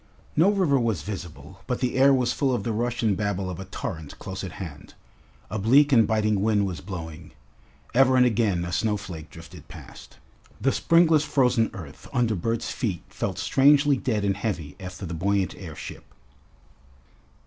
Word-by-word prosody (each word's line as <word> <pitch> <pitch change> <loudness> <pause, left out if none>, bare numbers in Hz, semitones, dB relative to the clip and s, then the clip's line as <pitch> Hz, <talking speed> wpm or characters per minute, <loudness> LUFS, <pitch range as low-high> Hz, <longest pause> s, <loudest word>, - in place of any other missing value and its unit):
No 165 +6 +5
river 185 -9 +2
was 110 -10 -1
visible, 95 -1 -8
but 125 - -1
the 125 -2 -1
air 135 +2 +6
was 125 -2 +2
full 135 -3 +1
of - - -3
the 115 - -2
rush 120 +2 -2
and 105 -3 +2
babble 100 -2 -2
of 85 - -7
a 95 - -6
torrent 80 -5 -6
close 95 0 -6
at 95 -3 -6
hand. 80 -7 -9 0.6
A 110 - -2
bleak 140 +8 +5
and 115 -4 +5
biting 110 -2 +1
wind 105 -1 +2
was 90 -6 -5
blowing. 80 -3 -8 0.6
Ever 130 +1 +5
and 125 - +6
again 105 -7 +1
a 85 - -5
snowflake 90 -4 -2
drifted 85 -1 -13
past. - - -13 0.4
The 135 - +2
springless 165 -1 +4
frozen 125 -6 +2
earth 75 -5 -10
under 120 -4 +2
Bert's 115 +5 -2
feet 100 -9 -3
felt 95 -3 -4
strangely 140 +7 +4
dead 110 -5 -1
and 100 -1 +1
heavy 90 -9 -4
after 90 +1 -7
the 85 - -5
buoyant 95 +3 0
airship. 85 -5 -9
105 Hz, 170 wpm, -25 LUFS, 90-125 Hz, 0.6 s, air